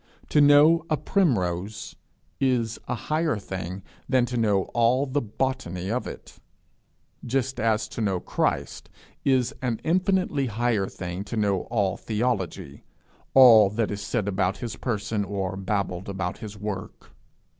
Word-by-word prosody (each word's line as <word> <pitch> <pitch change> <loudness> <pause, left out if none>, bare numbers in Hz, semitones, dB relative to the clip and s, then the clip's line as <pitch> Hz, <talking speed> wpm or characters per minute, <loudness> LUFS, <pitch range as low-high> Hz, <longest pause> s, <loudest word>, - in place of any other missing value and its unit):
To 150 - +4
know 145 +3 +6
a 155 - +2
primrose 105 - -1 0.4
is 125 -5 0
a 125 - -1
higher 155 +2 -1
thing 95 -1 -6 0.3
than 130 -2 +3
to 125 - -5
know 105 -5 +2
all 120 +3 +3
the 140 +1 -1
botany 105 -6 -3
of 125 +2 -2
it - - -10 0.8
just 130 +1 -1
as 110 -1 +1
to 115 - -5
know 95 -4 0
Christ - - -2 0.3
is 130 -1 +2
an 120 -4 -1
infinitely 180 -5 +1
higher 115 -3 0
thing 90 -2 -6
than 100 - -5
to 110 +2 -5
know 100 -3 +1
all 100 -5 0
theology, 105 - -3 0.5
all 115 -6 +8
that 105 +2 -1
is 100 0 -4
said 105 -1 -2
about 95 -1 0
his 120 -4 -5
person, 110 -3 -2
or 95 -1 -3
babbled 95 -1 -2
about 95 -1 -3
his 105 -2 -8
work. 100 -2 -6
110 Hz, 145 wpm, -25 LUFS, 100-130 Hz, 0.8 s, all